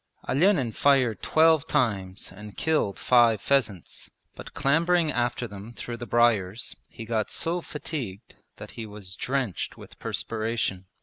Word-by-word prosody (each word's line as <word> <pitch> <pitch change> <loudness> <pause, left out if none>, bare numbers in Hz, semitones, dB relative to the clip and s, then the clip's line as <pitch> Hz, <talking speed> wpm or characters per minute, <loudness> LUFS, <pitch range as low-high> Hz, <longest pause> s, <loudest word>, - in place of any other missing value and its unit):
Olenin 150 - +3
fired 130 -3 +3
twelve 160 -2 +4
times 100 -9 -1
and 105 +1 -11
killed 155 -11 +1
five 120 -3 +4
pheasants, 110 -9 -1 0.3
but - - -10
clambering 165 +3 +3
after 120 -1 -1
them 100 +2 -10
through 120 0 -6
the 120 +1 -7
briers 115 -3 +2
he 115 - -9
got 110 -2 -1
so 175 +2 -1
fatigued 130 - -6 0.2
that - - -10
he 115 -1 -7
was 100 -2 -9
drenched 130 -8 -2
with - - -13
perspiration. 110 -4 -2
120 Hz, 135 wpm, -26 LUFS, 105-140 Hz, 0.3 s, twelve